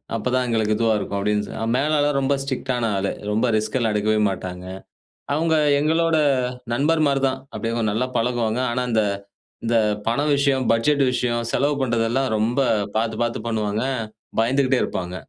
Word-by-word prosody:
அப்போதான் 125 +3 0
எங்களுக்கு 110 -2 +1
இதுவா 115 -1 +2
இருக்கும்" 100 -1 -3
அப்டின் 105 +1 0 0.2
அ - - 0
மேலாளர் 145 0 +1
ரொம்ப 140 +1 +2
ஸ்ட்ரிக்டான 130 -3 -2
ஆளு. 95 0 -1 0.2
ரொம்ப 110 +4 +1
ரிஸ்க்லாம் 110 +1 0
எடுக்கவே 105 +1 +1
மாட்டாங்க. 90 -1 -6 0.7
அவுங்க 160 +1 +1 0.2
எங்களோட 160 +2 +2 0.6
நண்பர் 155 +5 +2
மாரி 135 -1 +1
தான். 130 - -4 0.2
அப்டி 115 - -3
அவுங்க 115 -1 -1
நல்லா 125 +4 0
பழகுவாங்க. 120 0 0
ஆனா, 125 +1 -1
இந்த 110 -1 +3 0.6
இந்த 115 0 +2 0.3
பண 115 +4 0
விஷயம், 140 -2 +2
பட்ஜெட் 140 +5 +2
விஷயம், 120 -1 0
செலவு 145 +2 +1
பண்ணுறதெல்லாம், 120 +1 +1
ரொம்ப 115 +5 0 0.4
பாத்து, 110 0 0
பாத்து 120 0 -1
பண்ணுவாங்க. 110 0 -1 0.6
பயந்துகிட்டே 130 +3 +2
இருப்பாங்க. 90 0 -4
120 Hz, 150 wpm, -22 LUFS, 110-135 Hz, 0.7 s, இந்த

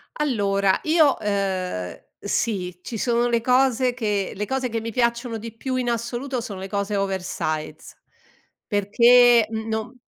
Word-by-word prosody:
Allora, 200 -9 +1
io 310 -3 +4
ehm, 190 - -2 0.2
sì, 190 -4 -2
ci 225 - -6
sono 240 +1 +1
le 235 -1 +1
cose 255 0 +2
che 210 -5 -2
le 210 +1 -3
cose 265 -1 -1
che 225 -1 -3
mi 230 +1 -5
piacciono 235 0 0
di 225 0 -9
più 260 +3 -4
in 250 -2 0
assoluto 240 +3 -3
sono 200 -4 -7
le 190 - -6
cose 200 +1 -2
oversize 180 -5 -3 0.7
perché, 235 +3 +5
uhm, 220 0 -4
non 220 +1 -4
225 Hz, 150 wpm, -23 LUFS, 200-245 Hz, 0.7 s, perché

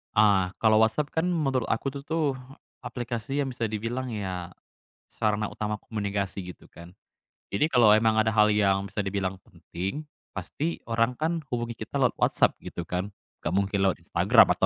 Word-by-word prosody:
Ah, 100 -3 +4
kalau 110 -1 +5
WhatsApp 110 +7 +2
kan 160 +1 0
menurut 140 -9 +1
aku 115 +5 -1
itu 140 0 -8
tuh 155 -4 0 0.5
aplikasi 120 +3 -3
yang 135 - -1
bisa 120 -2 -2
dibilang 115 +3 -3
ya, 90 -4 -4 0.5
sarana 105 -1 -1
utama 105 0 -2
komunikasi, 100 -3 -3
gitu 90 - -11
kan. 85 +3 -14 0.6
Jadi 150 +10 +2
kalau 120 -7 +6
emang 110 0 +4
ada 110 0 +3
hal 105 -1 +5
yang 100 -2 +2
bisa 105 - -3
dibilang 95 -1 -2
penting, 90 - -5 0.3
pasti 165 +3 -3
orang 115 +2 +2
kan 160 +3 -2
hubungi 120 -3 -3
kita - - -3
lewat - - +2
WhatsApp, - - +3
gitu - - -7
kan. 95 +3 -2 0.2
Enggak 80 - -3
mungkin 100 +1 +1
lewat 95 - +1
Instagram, 85 - +5
atau - - +3
110 Hz, 170 wpm, -27 LUFS, 100-125 Hz, 0.6 s, kalau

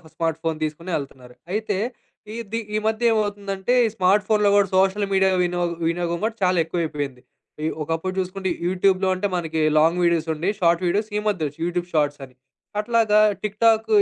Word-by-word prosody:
Smart 165 -1 -1
phone 160 -1 -1
దీసుకొనే 155 +4 -4
ఎళ్తున్నారు. 130 -3 -11 0.2
అయితే 210 -1 -1 0.6
ఇది 225 +1 -4 0.2
ఈ - - +3
మధ్యే‌మవుతుందంటే 210 -2 0
ఈ - - +2
స్మార్ట్ 190 +2 +3
ఫోన్‌లో 210 -2 +3
గూడా 200 -1 +4
సోషల్ 195 +2 +2
మీడియా 190 0 +4
వినోగం 175 -1 -1
వినియోగం 170 0 -1
గూడా 225 +1 -1
చాలా 180 0 +3
ఎక్కువైపోయింది. 150 -6 -3 0.4
ఈ - - +1
ఒకప్పుడు 165 +4 -2
జూసుకుంటే 190 0 -2 0.2
యూట్యూబ్‌లో 190 +1 +2
అంటే 195 +2 -1
మనకి 160 -2 -2 0.2
లాంగ్ 165 +3 +4
వీడియోస్ 170 -2 +2
ఉండి, 160 +4 -3
షార్ట్ 170 -1 +3
వీడియోస్ 205 +5 0
ఈ - - +1
మధ్యే 185 -7 0
ఒచ్ 145 - -22
యూట్యూబ్ 175 0 -2
షార్ట్స్ 145 -2 +1
అని. 130 -1 -13 0.4
అట్లాగ 225 0 +1 0.3
టిక్ 210 0 -4
టాక్ 225 -1 +4
185 Hz, 165 wpm, -23 LUFS, 165-205 Hz, 0.6 s, గూడా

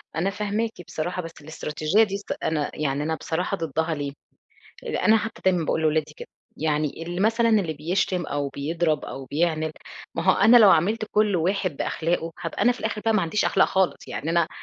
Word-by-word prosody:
أنا 170 +5 +1
فاهماكِ 210 +2 -1 0.2
بصراحة، 175 +3 -3
بس 165 -1 -8
الاستراتيجية 155 +5 +1
دي 200 -2 -2
صت 200 - -9
أنا 150 -2 -1
يعني 145 -1 -1
أنا 160 +1 -1
بصراحة 180 +5 -2
ضدّها 160 0 -1
ليه؟ 145 -1 -4 0.7
أنا 220 0 +3
حتّى 225 +1 -5
دايمًا 180 -3 +3
باقول 160 - 0
لولادي 155 -1 +1
كده. - - -9 0.3
يعني 155 0 -1
اللي 175 +2 -5
مثلًا 230 +3 +3
اللي 195 -8 +2
بيشتم 175 +3 -1
أو 145 -1 -2
بيضرب 155 +3 -1
أو 135 - -7
بيعند، 155 +2 0 0.4
ما 165 - -2
هو 190 - +5
أنا 225 +5 +6
لو 215 -4 +8
عاملت 210 +7 +2
كل 210 -2 +3
واحد 180 -2 0
بأخلاقه، 165 0 -1
هابقى 165 - -4
أنا 245 - +5
في 245 - -7
الآخِر 215 -1 -3
بقى 225 - +3
ما 215 - +3
عنديش 170 +5 0
أخلاق - - +3
خالص. 190 -1 0
يعني 155 - -4
أنا 170 -1 +2
170 Hz, 195 wpm, -24 LUFS, 155-200 Hz, 0.7 s, لو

